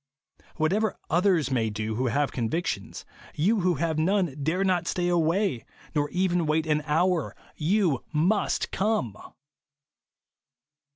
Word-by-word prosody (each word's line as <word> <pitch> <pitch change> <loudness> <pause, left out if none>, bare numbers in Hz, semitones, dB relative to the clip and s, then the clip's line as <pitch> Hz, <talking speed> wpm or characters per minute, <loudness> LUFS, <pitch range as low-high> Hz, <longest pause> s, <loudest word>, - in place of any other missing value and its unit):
Whatever 195 +7 0
others 175 -5 +2
may 115 -4 +1
do 110 +1 -3
who 125 +4 -1
have 140 +5 0
convictions, 130 +8 -3 0.3
you 205 +8 +2
who 180 -1 +2
have 160 +1 -1
none 180 -3 +1
dare 165 +7 0
not 185 -3 +1
stay 175 -1 0
away, 170 - +1 0.3
nor 145 -2 0
even 180 -2 0
wait 155 +1 +1
an 150 -1 +1
hour. 170 +2 +1 0.2
Tou 170 - +2
MUST 175 +7 +1
come 190 - 0
165 Hz, 125 wpm, -26 LUFS, 145-185 Hz, 0.3 s, others